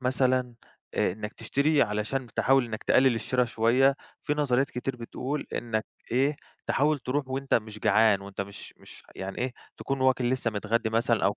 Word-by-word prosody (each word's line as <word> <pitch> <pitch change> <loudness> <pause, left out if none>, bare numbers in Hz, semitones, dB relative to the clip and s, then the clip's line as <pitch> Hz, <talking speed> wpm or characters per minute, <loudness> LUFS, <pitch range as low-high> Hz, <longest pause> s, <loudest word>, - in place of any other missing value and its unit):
مثلًا 125 -1 +1 0.4
آآ - - +1
إنك 105 +1 -6
تشتري 145 +1 +2
علشان 110 +5 -2
تحاول 135 -1 +4
إنك 110 -2 -6
تقلل 130 -1 +4
الشرا 125 +2 +1
شويّة، 120 +4 +3 0.3
فيه 150 - 0
نظريات 140 -2 +1
كتير 125 +1 -3
بتقول 130 +5 -4
إنك 110 -2 -2 0.3
إيه، 140 +4 +2 0.3
تحاول 150 +1 +2
تروح 135 +2 -2
وأنتَ 135 +1 -1
مش 110 -1 -1
جعان 110 -2 +4
وأنتَ 100 0 -7
مش 100 0 -8
مش - - -14
يعني 95 0 -6
إيه، 125 0 -1 0.2
تكون 135 -1 -3
واكل 130 -2 +2
لسه 130 -3 0
متغدّي 110 +2 -1
مثلًا 115 0 +1
أو 100 - +2
125 Hz, 170 wpm, -27 LUFS, 110-135 Hz, 0.4 s, تحاول